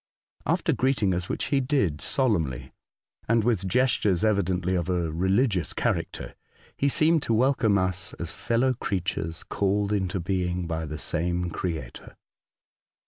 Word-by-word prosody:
After - - +1
greeting 130 -8 +1
us, 90 0 -3
which - - -2
he 140 - +4
did 125 - 0
solemnly, 85 - 0 0.6
and 115 0 +3
with 105 -5 +1
gestures 110 -5 +2
evidently 95 -4 +1
of 90 -1 -1
a 85 -3 0
religious 95 - +1
character, - - -2 0.4
he 140 - +1
seemed 160 +3 +3
to 115 - +1
welcome 115 -4 +3
us 90 -1 -1
as 85 -1 -4
fellow 125 +3 +1
creatures 90 -6 -3
called 100 +1 0
into 95 -2 -1
being 90 0 -1
by 80 -1 -3
the 75 +1 -5
same 85 +3 -1
Creator. 80 -9 -5
95 Hz, 140 wpm, -26 LUFS, 85-115 Hz, 0.6 s, he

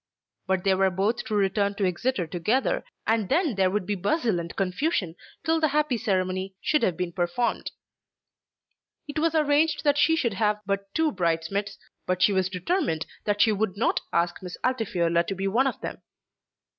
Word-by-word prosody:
But 190 -1 +1
they 195 - +3
were 190 0 +3
both 195 +6 0
to 215 - -2
return 200 0 +1
to 200 - 0
Exeter 185 +2 0
together, 215 - 0 0.2
and 220 -3 +1
then 315 -2 +2
there 190 -2 +2
would 200 0 -1
be 210 - -1
bustle 205 - 0
and 170 0 -6
confusion 195 - -1 0.3
till 325 0 +2
the 315 - +3
happy 300 -2 +1
ceremony 190 -3 -1
should 300 - +1
have 180 - +1
been 180 -1 -2
performed. 175 +7 -1 1.4
It 290 +1 -3
was 325 +1 +1
arranged 300 0 +2
that 290 -1 +3
she 325 - +4
should 240 -9 0
have 210 +1 +1
but 195 0 -2
two 320 -1 +2
bridesmaids, 180 +3 -1 0.3
but 185 0 +1
she 205 - +5
was 190 -1 +1
determined 185 - -1 0.2
that 205 0 +1
she 225 - +5
would 205 -1 -1
not 225 - +1
ask 175 +1 0
Miss 180 -1 -7
Altifiorla 175 -9 +1
to 195 - -2
be 195 +1 -2
one 245 +7 +2
of - - -3
them. - - -6
200 Hz, 180 wpm, -26 LUFS, 185-260 Hz, 1.4 s, she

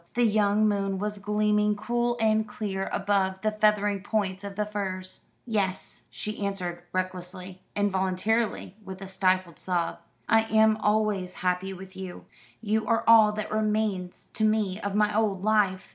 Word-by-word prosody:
The 240 0 +3
young 215 0 +3
moon 195 -2 0
was 205 +1 -3
gleaming 210 0 +1
cool 240 +2 -1
and 220 -1 +2
clear 200 -2 -3
above 190 -1 0
the 215 - +2
feathering 210 -2 +2
points 200 -2 -2
of 200 -1 -6
the 210 +1 0
firs. 190 -3 -5 0.2
"Yes," 200 -5 -2
she 210 -1 -5
answered 180 -3 -3
recklessly, 185 0 -5
involuntarily, 200 +2 0
with 190 -1 -8
a - - -7
stifled 185 -2 0
sob, 175 -2 -1 0.3
"I 225 0 +4
am 220 0 +4
always 210 -4 0
happy 180 +1 0
with 190 0 -10
you. 190 -1 -8 0.4
You 220 0 0
are 230 -1 +2
all 225 -2 +8
that 215 0 -4
remains 215 -4 -1
to 220 - -1
me 215 -3 +1
of 200 -2 -3
my 210 0 +2
old 205 -4 +1
life." 205 -3 +2
205 Hz, 155 wpm, -27 LUFS, 190-215 Hz, 0.4 s, all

